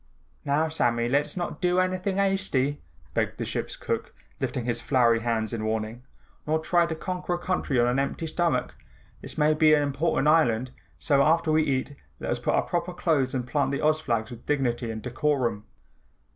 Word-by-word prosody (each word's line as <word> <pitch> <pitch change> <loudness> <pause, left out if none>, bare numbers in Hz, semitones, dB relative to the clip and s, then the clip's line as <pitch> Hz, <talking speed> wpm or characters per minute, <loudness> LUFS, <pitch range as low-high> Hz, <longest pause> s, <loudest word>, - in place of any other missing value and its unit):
"Now, 145 +3 +1
Sammy, 120 -7 +1
let's 145 +7 0
not 175 0 -4
do 180 -1 +2
anything 185 +1 0
hasty," 190 -8 +1 0.3
begged - - -1
the - - -3
ship's - - -3
cook - - -4 0.2
lifting 125 - -2
his 120 -1 -1
floury 120 -3 +3
hands 115 -2 -1
in 110 -2 -3
warning, 110 +2 -2 0.5
"nor 155 +1 +2
try 170 +2 +2
to 160 - -3
conquer 180 +1 -3
a - - -3
country 175 -7 -1
on 120 - +4
an 125 +2 +1
empty 140 +4 -2
stomach. 160 -5 0 0.5
This - - -8
may 155 0 +4
be 155 0 +5
an 145 - +2
important 145 +1 0
island, 130 -6 +3 0.3
so 140 -2 +2
after 160 +2 +3
we 155 0 +4
eat, 140 -1 -1 0.2
let - - -3
us - - -1
put - - 0
on - - +2
our - - -13
proper 175 +1 -2
clothes 140 -8 +1
and 125 -2 -1
plant 140 +2 +1
the 140 +2 -1
Oz 155 0 +3
flags 115 -5 -1
with 120 -1 -11
dignity 125 -5 0
and 110 -1 -5
decorum." 125 -4 -1
145 Hz, 195 wpm, -26 LUFS, 120-160 Hz, 0.5 s, be